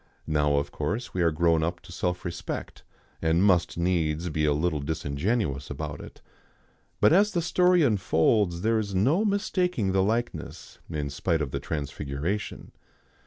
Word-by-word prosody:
Now 75 -2 +2
of 70 - -1
course 115 +4 -3
we 90 - -1
are 85 - +4
grown 80 +1 +2
up 85 +2 -1
to - - -14
self 90 +1 -2
respect, 85 - -5 0.4
and 80 +3 +2
must 90 -5 +3
needs 85 -1 0
be 75 -1 0
a 75 - +3
little 75 +1 0
disingenuous 70 - -2
about - - -5
it. - - -13 0.8
But - - +5
as 205 +4 +4
the 175 - +1
story 180 0 +4
unfolds 95 - +2
there 110 +2 +2
is 100 -3 -3
no 135 - +3
mistaking 185 - 0
the 95 0 +2
likeness, 115 +5 -3
in 75 -3 -3
spite 80 +3 0
of 70 - -5
the - - -2
transfiguration. 75 +6 -4
90 Hz, 160 wpm, -27 LUFS, 75-110 Hz, 0.8 s, But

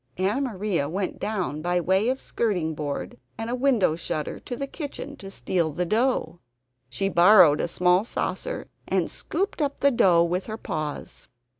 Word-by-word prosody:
Anna 195 +9 +1
Maria 200 - -1
went 185 +3 -3
down 185 -8 -2
by 175 +2 +1
way 190 +6 +2
of 260 +1 -1
skirting 180 -9 -1
board 145 -4 -5 0.2
and 225 +1 -4
a - - 0
window 245 - +2
shutter 155 -2 -4
to 245 - -6
the 275 - -3
kitchen 285 0 -7
to 195 - -9
steal 170 0 -1
the 180 +4 -2
dough. 215 -5 0 0.5
She 195 +10 -1
borrowed 175 -4 +6
a - - 0
small 180 +2 +3
saucer - - -3 0.2
and - - 0
scooped 365 0 -3
up 280 -1 -1
the 280 - +4
dough 180 -8 +5
with 180 +2 -2
her 220 0 -5
paws. 155 -7 -5
190 Hz, 170 wpm, -25 LUFS, 170-240 Hz, 0.5 s, borrowed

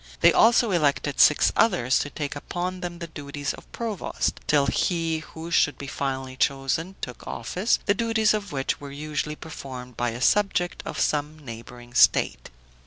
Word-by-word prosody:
They - - +7
also 230 -1 +5
elected 145 -4 +1
six 150 - +6
others 175 - +3
to 145 - -2
take 145 0 -4
upon 180 +5 -4
them 175 -1 -5
the 170 - -6
duties 145 -3 -5
of - - -14
provost, 225 -5 -2
till 145 -2 +4
he 165 +1 0
who 160 +1 -9
should 145 -3 +3
be 140 - -7
finally 135 -1 -3
chosen 140 +8 0
took 125 -2 -7
office, 180 - 0
the 205 - +4
duties 220 0 +2
of 205 -3 -3
which 135 0 -2
were 140 - -7
usually 150 +1 -3
performed 130 -6 -9
by 120 0 0
a 115 +1 -6
subject 180 +4 +2
of - - -4
some 150 +1 0
neighboring 120 -2 -10
state. - - +3
150 Hz, 170 wpm, -25 LUFS, 135-180 Hz, -, They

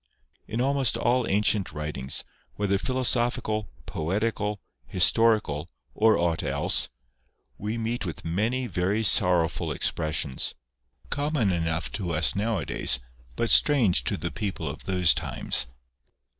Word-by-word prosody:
In 115 +3 -2
almost 135 -3 +2
all 125 0 +1
ancient 105 -1 +2
writings 75 -3 -4 0.3
(whether 100 -1 0
philosophical, 120 -3 +1 0.2
poetical, 105 +5 -2 0.3
historical, 90 - +2 0.2
or 110 -1 +3
aught 85 -1 0
else), 70 -1 +2 0.7
we 105 +3 -3
meet 115 +1 -3
with 85 -5 -6
many 110 +10 -1
very 100 0 -1
sorrowful 90 -6 +2
expressions, 75 -4 -1 0.6
common 145 -7 0
enough 80 -1 -2
to 90 -5 -3
us 80 +2 +2
nowadays, 105 - +1 0.4
but 115 - 0
strange 110 - +4
to - - -1
the - - -4
people 100 -3 -4
of - - -7
those 90 -3 +4
times. - - 0
100 Hz, 115 wpm, -26 LUFS, 85-115 Hz, 0.7 s, strange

